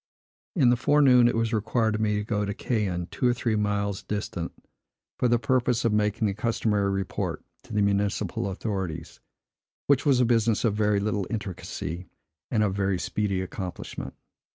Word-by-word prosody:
In 130 -9 +5
the - - +4
forenoon 130 -2 +5
it 120 - +1
was 115 0 0
required 110 +1 +1
of 105 - -1
me 105 -1 +1
to 105 - -1
go 105 -1 -1
to 100 -1 -3
Caen 100 -9 -1
(two 125 - +1
or 120 - +3
three 115 -2 0
miles 100 -1 0
distant) 95 -4 -4 0.7
for 125 - +3
the 120 0 +4
purpose 125 -2 +1
of 115 - +2
making 105 +1 +1
the 100 - +1
customary 105 -2 0
report 95 -1 -3 0.2
to - - -14
the 105 -1 +2
municipal 100 -1 0
authorities, 95 -4 -4 0.7
which 140 -2 +3
was 140 -4 +4
a 125 - +4
business 115 -1 +2
of 110 - +2
very 105 -1 +2
little 100 -2 -1
intricacy, 95 -4 -5 0.4
and 110 -3 +2
of 100 -3 +1
very 100 -1 0
speedy 100 +1 -1
accomplishment. 95 -1 -6
105 Hz, 175 wpm, -26 LUFS, 100-115 Hz, 0.7 s, In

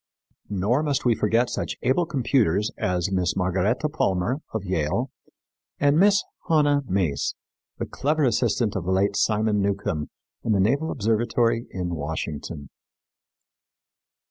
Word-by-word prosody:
Nor 105 +7 +1
must 145 -4 -1
we 120 - +5
forget 115 +3 +2
such - - -3
able 135 +7 +2
computers 115 - +1
as 90 0 -1
Mrs. 90 -2 0
Margaretta 95 - +1
Palmer, 120 - 0
of 110 -3 -4
Yale, 90 - -1 0.7
and 145 +2 +3
Miss 200 +1 +5 0.3
Hanna 145 -3 +4
Mace, 90 -7 0 0.4
the - - -3
clever 150 +2 0
assistant 120 -3 +1
of 95 -3 -3
the 95 - 0
late 100 +2 +2
Simon 105 0 +2
Newcomb 100 -6 -1 0.3
in 110 - +1
the 100 - +2
Naval 140 +11 +2
Observatory 115 0 +1
in 90 -2 -4
Washington. 75 -1 -5
105 Hz, 130 wpm, -24 LUFS, 95-130 Hz, 0.7 s, we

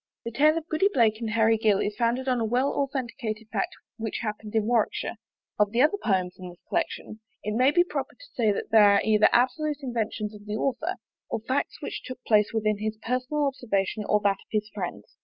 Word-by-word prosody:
The 230 - -3
tale 305 +6 +4
of 325 0 -4
Goody 365 +6 +2
Blake 225 - +3
and 225 - -2
Harry 225 0 +3
Gill 215 -3 +3
is 205 - -1
founded 240 +3 0
on 250 -2 +2
a - - 0
well 245 +5 +1
authenticated 240 -5 -3
fact 200 - -2 0.2
which 220 -2 -3
happened 215 0 -5
in 220 -1 +2
Warwickshire. 230 0 0 0.4
Of 210 -1 +4
the 235 +5 +3
other 360 +7 +2
poems 185 -4 0
in 180 -1 -7
the 175 - -12
collection, 330 -9 -3 0.2
it 210 - -2
may 255 +3 +5
be 350 +4 +4
proper 355 - -4
to - - -15
say 220 -4 +2
that 200 - -4
they 220 - +7
are 200 -1 +6
either 215 -1 +5
absolute 290 +5 +2
inventions 220 -4 -2
of 210 0 -13
the 210 - -2
author, 275 +10 -1 0.3
or - - -2
facts 260 +5 -2
which - - -4
took 255 - -7
place 210 -2 +3
within 215 -2 0
his 215 0 -3
personal 255 +6 -1
observation 220 -6 -1
or 210 - +4
that 200 -1 +2
of - - -20
his 215 -1 -1
friends. 175 - -6
225 Hz, 215 wpm, -26 LUFS, 210-260 Hz, 0.4 s, they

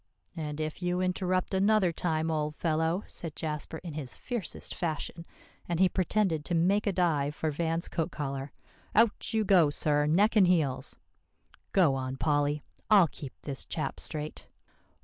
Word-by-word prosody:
"And 150 -2 -4
if 155 +3 -3
you 180 0 0
interrupt 185 0 0
another 195 -1 +3
time, 160 -1 0
old 150 -1 -1
fellow," 160 +4 0
said 165 -3 -5
Jasper 155 0 -3
in 170 -4 -6
his 145 -4 -6
fiercest 240 -9 -3
fashion, 170 0 -3 0.4
and 170 -1 0
he 190 - +6
pretended 185 -3 +1
to 175 - -1
make 195 +6 +2
a - - +3
dive 155 -6 +1
for 155 0 -1
Van's 165 +2 -1
coat 165 0 -2
collar, 140 -3 -4 0.4
"out 225 0 +3
you 220 -1 +1
go, 180 -6 +5
sir, 145 0 +1
neck 200 +9 +3
and 195 -4 +6
heels. 155 -8 +1 0.7
Go 175 -8 +4
on, 130 0 -3
Polly; 145 0 +1 0.3
I'll 195 -7 +7
keep 140 -4 -10
this 140 -2 -4
chap 150 -4 -4
straight." 150 0 -6
165 Hz, 160 wpm, -29 LUFS, 150-185 Hz, 0.7 s, I'll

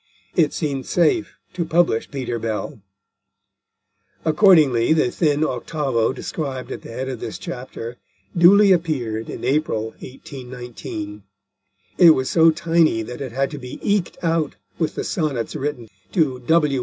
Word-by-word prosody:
It 155 -4 +3
seemed 140 -5 -3
safe 320 - +1 0.2
to 180 -1 -1
publish 165 -8 +1
Peter 125 -4 -3
Bell. 110 +2 -4 1.4
Accordingly, 155 - +5
the 155 -6 +2
thin 150 -2 +1
octavo 130 -4 0
described 130 -2 -5
at - - -5
the - - -11
head 130 +3 -4
of 130 -3 -5
this - - -5
chapter 125 -1 -7 0.4
duly 195 +4 +7
appeared 130 -11 0
in - - -7
April 125 -5 0
1819. 125 -6 -8 0.8
It 175 - +9
was 130 0 -1
so 165 -1 +6
tiny 165 -7 +2
that 125 +5 -8
it 130 -3 -5
had 135 +3 -1
to 145 - -6
be 125 -1 -8
eked 200 -4 0
out 165 -3 0 0.2
with 160 -3 -1
the - - -2
Sonnets 145 - -2
written 140 -5 -3 0.3
to 150 -9 +1
W. 150 -5 +3
140 Hz, 145 wpm, -21 LUFS, 125-165 Hz, 1.4 s, It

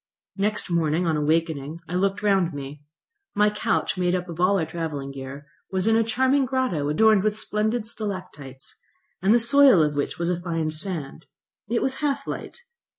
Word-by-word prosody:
Next 205 -1 -1
morning, 165 +1 +1
on 160 -2 +1
awakening, 155 0 -1
I 175 - -7
looked 195 +3 0
round 195 -4 +2
me. 140 +1 -7 0.5
My 210 0 +4
couch, 210 -2 -1
made 180 0 +2
up 180 0 -3
of 170 0 -7
all 195 +2 +4
our 165 - 0
travelling 155 -5 -4
gear, 135 +1 -8 0.3
was 190 0 0
in 225 0 +4
a 225 - +4
charming 260 +5 +2
grotto, 240 - 0
adorned 215 +6 +4
with 210 +1 0
splendid 215 +2 -1
stalactites, 180 - -7 0.4
and 190 +3 +3
the 240 - +6
soil 255 - +6
of 150 -1 0
which 145 - -2
was 170 +1 -1
a 175 -1 -2
fine 165 -3 -2
sand. 160 -3 -5 0.4
It 235 0 +1
was 265 0 -1
half 280 -2 -1
light. 480 - -7
180 Hz, 180 wpm, -24 LUFS, 155-215 Hz, 0.5 s, the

